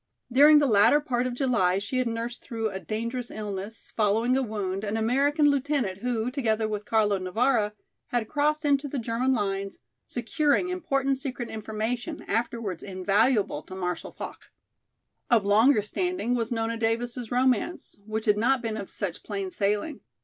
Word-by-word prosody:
During 295 +4 +8
the 295 - +4
latter 220 +4 +5
part 255 -4 -1
of 245 - -4
July 235 -9 +2
she 205 +6 -1
had 255 - +1
nursed 230 +1 -4
through 225 -2 -3
a 190 - -5
dangerous 235 +4 -4
illness, 205 0 -6
following 225 +4 +2
a 265 - +2
wound, 205 -5 -3
an 215 +1 -1
American 280 +7 +2
lieutenant[A] 275 -9 -1
who, 240 0 -1
together 225 -5 0
with 210 -1 -4
Carlo 210 -3 +2
Navara, 215 +3 +1 0.3
had 240 -5 -1
crossed 300 +2 0
into 285 0 +2
the 280 - -4
German 235 +2 0
lines, 195 -4 -1 0.3
securing 290 +8 +1
important 275 -7 0
secret 255 -3 -5
information, 220 +7 -4
afterwards 225 -4 -2
invaluable 200 - +1
to 185 - -10
Marshal 180 -2 -3
Foch. - - -9 0.8
Of 225 -4 +4
longer 215 +3 +5
standing 355 - -1
was 235 -1 -1
Nona 230 0 -1
Davis's 235 +1 -1
romance, 255 +5 0
which 215 +1 -4
had 210 -1 +3
not 255 +2 +2
been 220 -1 -2
of 200 -2 -6
such 185 -4 -4
plain 195 -3 -4
sailing. 210 +11 -1
230 Hz, 160 wpm, -27 LUFS, 210-260 Hz, 0.8 s, During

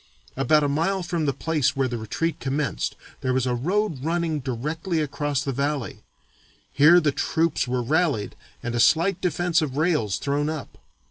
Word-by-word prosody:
About 145 +3 +3
a - - +2
mile 170 +7 0
from 170 -3 -1
the - - +3
place 150 0 0
where 135 -1 +1
the 120 -2 -4
retreat 160 +10 -2
commenced 140 +2 -2 0.2
there 130 0 -1
was 130 -1 +1
a 125 - 0
road 165 - -1
running 165 -1 0
directly 150 +7 -3
across 145 -2 -1
the 140 - -2
valley. 140 0 -2 0.7
Here 150 +6 +7
the 155 -4 +1
troops 160 -1 0
were 125 0 -1
rallied 145 -6 0 0.3
and 120 - -3
a 120 - -1
slight 170 +9 +3
defence 175 -1 +1
of 140 -3 -3
rails 150 - +1
thrown 145 +1 -1
up. 155 -3 -6
145 Hz, 175 wpm, -24 LUFS, 130-165 Hz, 0.7 s, Here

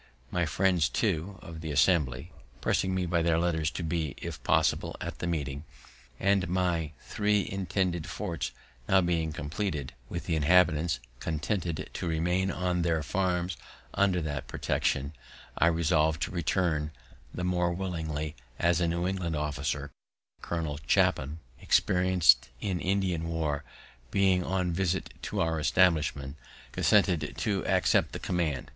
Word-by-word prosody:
My 85 -2 +1
friends, 90 -2 +2
too, 95 -2 -1
of 80 -2 -8
the 80 - -5
Assembly, 75 -1 +2 0.3
pressing 95 0 +1
me 95 -1 0
by 85 -1 +1
their 80 0 +2
letters 80 -2 +1
to 70 +7 -5
be, 80 -3 -2
if - - -6
possible, - - +2
at - - -6
the 85 - -2
meeting, 70 -4 -2 0.6
and 100 -2 +2
my 85 -4 0
three 105 -1 +1
intended 90 -3 -1
forts 85 -6 -3 0.6
being 85 -2 +1
now 75 - -7
compleated, 75 -1 -3 0.2
and 85 - -3
the 85 - -1
inhabitants 80 -2 +3 0.2
contented 85 +1 -2
to 90 - -3
remain 90 +4 +1
on 90 -2 0
their 85 -2 +1
farms 90 0 -1 0.4
under 95 -3 +2
that 75 -2 -4
protection, 70 +3 -1 0.4
I 85 - +4
resolved 80 -2 +2
to - - -3
return; 85 -3 0 0.4
the 90 - -5
more 90 -1 +1
willingly, 80 -4 -3 0.2
as 85 0 +2
a 85 - +2
New 85 +1 -1
England 90 -4 -2
officer, 70 -1 -2 0.5
Colonel 80 -4 -3
Clapham, 75 +5 +2 0.2
experienced 90 -9 +4
in 95 -4 -2
Indian 90 -3 0
war, 75 -3 -1 0.5
being 95 0 +3
on 90 0 0
a - - -1
visit 95 +1 -1
to 105 - -2
our 80 -2 +1
establishment, 75 -5 +2 0.3
consented 90 -8 +2
to 100 -3 0
accept - - +3
the - - -4
command. 80 -8 -1
85 Hz, 140 wpm, -29 LUFS, 75-90 Hz, 0.6 s, I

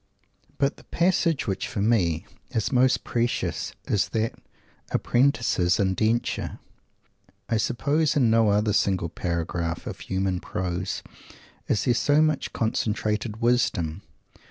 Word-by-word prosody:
But 140 +1 +1
the - - -16
passage 170 -3 +1
which, 100 +4 -2
for 125 -5 -5
me, 95 -6 +2 0.2
is 115 -4 -1
most 130 0 +3
precious 120 0 -1
is 100 - +1
that 110 0 -1 0.6
Apprentice's 120 -8 +2
"Indenture." 110 +4 0 0.9
I 115 - +1
suppose 145 +7 +1
in 125 -6 +4
no 115 -1 +4
other 105 +1 +2
single 95 -4 +1
paragraph 85 -1 -3
of - - -6
human 95 -1 -1
prose 90 +1 -3 0.6
is 105 - +1
there 125 - +4
so 145 +5 +3
much 155 -2 +1
concentrated 110 0 -1
wisdom. 100 -8 +1
110 Hz, 120 wpm, -25 LUFS, 95-125 Hz, 0.9 s, in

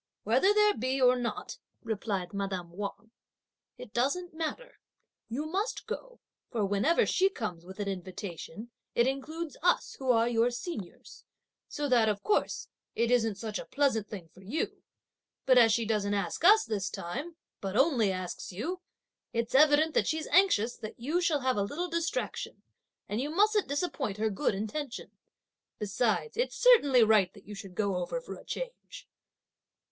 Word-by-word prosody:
"Whether 255 - +4
there 420 0 +5
be 260 +3 -1
or 250 -1 +6
not," 245 -2 -4 0.2
replied 205 -5 -3
madame 190 -3 -3
Wang, 205 +4 -6 0.7
"it 210 - -11
doesn't 300 +9 0
matter; 330 +11 -5 0.5
you 270 +7 -3
must 390 +9 -2
go, - - -7 0.3
for 220 -4 0
whenever 205 - +3
she 385 +1 +3
comes 180 - -5
with 190 +3 -10
an 205 - -2
invitation, 190 +3 -6 0.2
it 235 - +4
includes 290 +3 -3
us, 355 +2 +2
who 265 -1 -3
are 230 -1 +4
your 235 0 +3
seniors, 245 - -7 0.4
so 295 0 -3
that, 235 -4 +4
of 205 -1 -2
course, 420 - 0 0.3
it 235 +1 +1
isn't 225 -4 +3
such 215 +1 -4
a - - -7
pleasant 265 -7 +1
thing 190 -6 -7
for 185 - -18
you; 220 +12 -3 0.6
but 255 -2 +6
as 225 -2 +6
she 230 +1 +2
doesn't 205 -2 0
ask 195 - -2
us 425 +5 +7
this 200 -3 -2
time, 275 - -5 0.2
but 195 +1 -3
only 255 - +4
asks 185 0 -5
you, 320 - -4 0.5
it's 230 0 -1
evident 305 +3 +5
that - - +2
she's 315 -1 -1
anxious 245 - +4
that 215 - -8
you 305 +9 0
should 305 -6 +1
have 255 -3 +1
a - - +2
little 295 - -2
distraction, 335 0 -3 0.4
and 210 +4 -2
you 285 - -2
mustn't 420 +5 +3
disappoint 285 - -2
her 220 0 0
good 195 +1 0
intention. 235 +6 -5 0.7
Besides 220 - -1
it's - - 0
certainly 290 - +6
right 215 -4 +4
that 200 - -15
you 210 - -8
should 195 -2 -9
go 200 -2 0
over 180 - -2
for - - -8
a - - -13
change." - - -7
240 Hz, 165 wpm, -30 LUFS, 205-315 Hz, 0.7 s, us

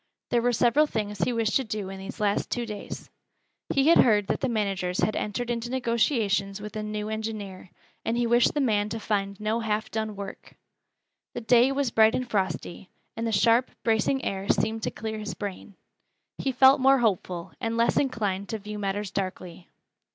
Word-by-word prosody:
There 240 - +3
were 245 +1 +2
several 245 +6 +3
things 210 -5 -3
he 175 - +1
wished 225 -2 0
to 265 - -1
do 210 -4 -4
in 195 0 -7
these 195 +4 -8
last 205 -1 0
two 240 -1 -2
days. 210 -2 -8 0.6
He 275 +2 +3
had 335 - +6
heard 210 -4 +5
that - - -1
the 265 - 0
managers 195 -5 -1
had 215 - +1
entered 235 +4 -2
into 235 0 -3
negotiations 230 -5 0
with 210 0 -8
a 215 - -2
new 210 0 -4
engineer, 215 -4 -5 0.3
and 230 +1 -1
he 240 - +1
wished 240 +3 +3
the 295 - +1
man 210 -5 +1
to 225 +2 -4
find 200 -2 -2
no 215 +2 0
half 220 -1 -2
done 220 -1 -3
work. 200 -1 -9 0.8
The - - -3
day 240 +3 +4
was 275 -3 0
bright 220 0 +5
and 255 - -2
frosty, 195 -4 -3 0.3
and 230 +1 -2
the - - -1
sharp, 230 +4 +3
bracing 230 +4 +1
air 195 0 -3
seemed 225 0 +1
to - - -1
clear 220 0 -5
his 210 -2 -5
brain. 200 0 -7 0.6
He 270 - 0
felt 265 +2 +6
more 270 +1 +6
hopeful, 185 -7 -1
and 230 -1 -1
less 235 0 +2
inclined 205 -7 -1
to 220 - -2
view 210 0 -7
matters 200 0 -2
darkly. 185 -3 -5
220 Hz, 195 wpm, -26 LUFS, 200-235 Hz, 0.8 s, had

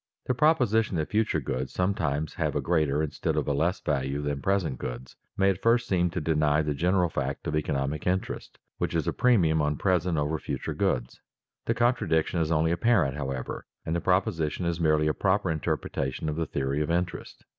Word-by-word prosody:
_ - - -67 0.2
The 125 - +2
proposition 120 - +2
that 80 - -2
future 110 -6 +1
goods 65 -1 -3
sometimes 80 -6 -1
have - - -2
a - - +2
greater 75 -3 +1
instead 75 - -2
of - - -1
a 70 - +1
less 85 +6 +1
value 70 -1 -1
than 70 -1 -2
present 95 -10 0
goods - - -6 0.2
may 95 -1 +4
at 95 0 -5
first 120 +1 +3
seem 90 -2 +2
to 90 - -3
deny 75 -1 +2
the 75 -1 -1
general 90 +4 +2
fact 70 -3 -3
of - - -1
economic 70 0 -1
interest, 95 +1 -2 0.2
which - - -1
is - - 0
a - - +1
premium 85 -11 +3
on 75 -1 0
present 90 -2 +1
over 75 +2 0
future - - -4
goods. - - -1 0.4
The 115 - 0
contradiction 90 -9 +1
is 80 0 0
only 80 +1 +2
apparent, 85 - +2
however, 65 -3 -4 0.2
and 80 - -1
the 85 - -1
proposition 90 -3 0
is 85 0 -1
merely 75 -2 +3
a 75 - +2
proper 95 -1 +1
interpretation 75 -2 -2
of 75 - -2
the 80 -1 -2
theory 70 +1 -1
of 75 - -1
interest. 85 +1 -3
80 Hz, 200 wpm, -27 LUFS, 75-95 Hz, 0.4 s, may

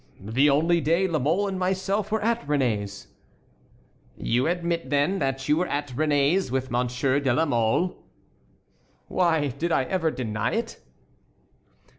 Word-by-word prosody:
"The 120 +9 +2
only 165 +4 +3
day 165 +6 +2
La 165 -4 -1
Mole 170 +10 +1
and 190 -1 -4
myself 190 +3 -1
were 220 -1 0
at 235 +1 +1
Réné's." 110 -9 -1 1.1
"You 125 +5 0
admit, 170 -4 -1
then, 145 +7 +1
that 135 -1 -2
you 150 - +3
were 180 +2 0
at 145 0 -3
Réné's 145 +5 +1
with 130 +1 -2
Monsieur 125 +3 0
de 135 -3 0
la 160 +7 +2
Mole?" 120 +6 0 1.0
"Why, 160 -5 +1
did 155 +7 -3
I 135 - +2
ever 165 +3 0
deny 110 -7 -2
it?" 230 +1 -3
150 Hz, 145 wpm, -25 LUFS, 130-175 Hz, 1.1 s, only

